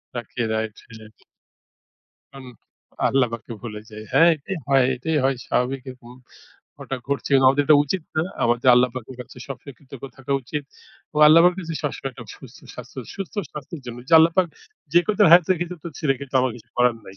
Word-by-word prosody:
রাখে 120 0 -5
Right, 110 -1 -2
হ্যাঁ। 110 -2 -15 1.1
তখন 135 -1 -10 0.6
আল্লাহপাককে 120 -3 -1
ভূলে 105 -3 -7
যাই। 110 0 -9
হ্যাঁ, 165 +1 +6
এটাই 165 +6 -6
হয় 135 -2 +4
এটাই 155 +5 -2
হয়, 135 0 +2
স্বাভাবিক 130 +1 -1
এরকম, 125 -2 -12 0.7
ঘটা 135 - -5
ঘটছে 140 -1 -2
এবং 135 - +5
আমাদের 145 +2 +2
এটা 150 0 +7
উচিত 175 +5 -3
না, 155 - +2 0.2
আমাদের 120 +2 +1
আল্লাহপাকের 125 0 0
কাছে 125 - -11
সবসময় 140 0 -9
কৃতজ্ঞ 135 -1 -12
থাকা 135 +1 -4
উচিত, 145 +4 -4 0.5
ও - - -8
আল্লাহপাকের 170 +4 +6
কাছে 165 0 -5
সবসময় 135 -1 -3
একটা - - -11
সুস্থ - - -14 0.2
স্বাস্থ্য, - - -10 0.2
সুস্থ 195 +1 -7 0.2
স্বাস্থ্যের 150 +2 -8
জন্য 120 0 -7
যে, - - -7
আল্লাহপাক 170 +3 +4 0.5
যে 175 - +6
কয় 215 - -1
দিন - - +6
হায়াতে 175 0 +6
রেখেছো 175 0 -4
তো - - -4 0.2
রেখেছো 135 - +1
কিন্তু 140 -1 -10
আমার 130 -1 0
কিছু 115 - -17
করার 125 -1 +3
নাই। 95 - -12
135 Hz, 180 wpm, -22 LUFS, 120-155 Hz, 1.1 s, এটা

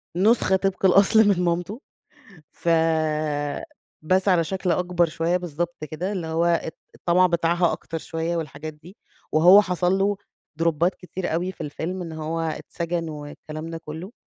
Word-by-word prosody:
نسخة 195 0 +3
طبق 195 0 0
الأصل 200 +3 +6
من 185 -3 +3
مامِته. 180 - -1 0.7
ف 170 - -3 1.3
بس 185 +5 +1
على 175 -3 +4
شكل 190 +1 -2
أكبر 175 0 +2
شوية، 170 +2 0
بالضبط 175 -1 -4
كده 180 +6 -3
اللي 175 -5 -3
هو 165 +1 0
ات 170 -1 0 0.2
الطمَع 180 +1 +3
بتاعها 170 0 +2
أكتَر 165 - -5
شوية 165 +1 -3
والحاجات 155 0 -6
دي. 170 +6 -16 0.3
وهو 180 +6 +8
حصل 180 0 0
له 200 +1 +1 0.4
دروبات 170 +2 +2
كتير 180 -2 -5
أوي 180 +3 -1
في 175 - -11
الفيلم، 170 +5 -4
إن 165 -2 -6
هو 160 +1 -4
اتسجن 165 +1 -3
والكلام 155 +1 -8
ده 165 - -5
كلّه، 160 +7 -7
175 Hz, 150 wpm, -24 LUFS, 165-185 Hz, 1.3 s, وهو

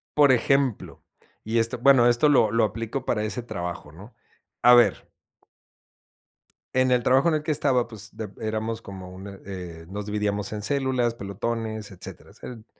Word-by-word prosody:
Por 145 -2 +6
ejemplo, 130 0 0 0.4
y 115 +2 0
esto, 115 +1 0
bueno, 125 -1 +6
esto 120 +5 +4
lo 115 -7 +4
lo 115 0 +2
aplico 115 +4 -4
para 105 -2 0
ese 115 +3 -4
trabajo, 85 -8 -6
¿no? 100 +10 -14 0.5
A 125 - +7
ver. 120 -1 +4 1.6
En 130 0 +3
el 125 -1 +3
trabajo 135 +5 +4
en 165 - +3
el 150 - -2
que 155 - -1
estaba, 135 -5 +1
pues, 110 -2 -10
de 110 -2 -6
éramos 110 +1 -3
como 95 -3 -9
un, 100 +1 -10
eh, 90 -4 -8
nos 100 +1 -5
dividíamos 105 -1 -2
en 105 - -4
células, 130 -1 0
pelotones, 110 +1 -4
etcéteras. 95 - -11
Eran 115 -3 -9
115 Hz, 165 wpm, -25 LUFS, 105-125 Hz, 1.6 s, A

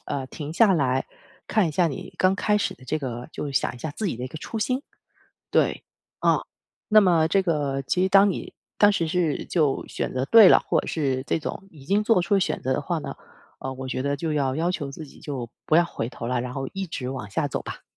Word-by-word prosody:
呃， 135 -2 -3
停 150 +3 -7
下 210 +2 +5
来 130 -4 +1 0.4
看 210 -6 +2
一 - - -2
下 170 +3 +2
你 140 - -6
刚 185 +1 +4
开 210 +1 +1
始 - - -1
的 130 - -17
这 155 +5 -1
个 125 -2 -5
就 145 -2 -4
想 125 - +1
一 - - -11
下 155 - -4
自 215 - -3
己 145 - -2
的 125 - -5
一 - - -3
个 155 - -9
初 225 - -5
心。 255 +5 0 0.7
对， - - +2 0.3
啊， - - +2 0.5
那 215 0 +7
么 170 -5 +4
这 195 +2 +3
个 145 -6 -1
其 180 +7 0
实 190 - +3
当 195 +1 +6
你 - - -4 0.2
当 205 0 +6
时 170 -5 0
是 165 -3 0
就 150 -6 0
选 - - -4
择 130 +1 -1
对 220 +3 +8
了， - - +7
或 - - +2
者 - - -10
是 135 -5 -1
这 - - 0
种 190 +5 -6
已 145 -4 -15
经 200 +6 +2
做 225 -3 +3
出 195 +3 +2
选 - - -1
择 130 - -1
的 130 - 0
话 170 +3 -2
呢， 140 -2 -6 0.5
呃， 130 - -4
我 130 0 -6
觉 130 0 -2
得 140 0 0
就 160 +2 -2
要 140 -2 0
要 170 +3 +1
求 145 -6 -4
自 155 +2 -8
己 - - -16
就 130 -5 -5 0.2
不 155 - +3
要 170 - +6
回 115 -8 -4
头 115 - -7
了， 125 0 0
然 125 0 -5
后 135 0 -3
一 195 -1 -4
直 130 -5 -4
往 130 -7 -5
下 - - 0
走 - - -3
吧。 - - -8
155 Hz, 270 characters per minute, -25 LUFS, 135-185 Hz, 0.7 s, 对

